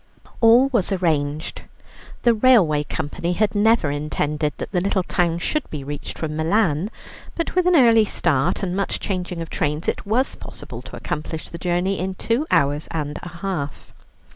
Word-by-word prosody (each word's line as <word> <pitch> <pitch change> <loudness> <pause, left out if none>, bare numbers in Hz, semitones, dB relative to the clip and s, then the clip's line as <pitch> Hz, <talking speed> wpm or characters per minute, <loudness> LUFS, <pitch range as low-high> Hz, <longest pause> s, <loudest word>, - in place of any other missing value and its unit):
All 240 +4 +6
was 230 -7 0
arranged. 155 -5 -1 0.6
The 235 - +5
railway 210 - +4
company 170 +4 -3
had 210 +2 +1
never 210 -7 +3
intended 150 +1 -1
that - - -6
the 180 -3 +1
little 190 0 +1
town 170 -1 0
should 300 - -2
be 150 -3 -5
reached 145 +1 -6
from 155 -1 -3
Milan, 165 +1 +1 0.5
but 335 - -2
with 365 0 +2
an 360 - +5
early 230 -6 +6
start 170 0 0
and 180 -1 -1
much 200 0 -1
changing 180 -3 -3
of 165 - -12
trains 150 +2 -1
it - - -1
was 235 +6 +1
possible - - -9
to - - -10
accomplish 155 +1 -5
the 170 - -8
journey 180 +2 0
in 185 +1 -3
two 235 +10 -1
hours 145 +2 +2
and 150 -2 -3
a 175 - -7
half. 170 -5 -5
175 Hz, 170 wpm, -22 LUFS, 150-215 Hz, 0.6 s, All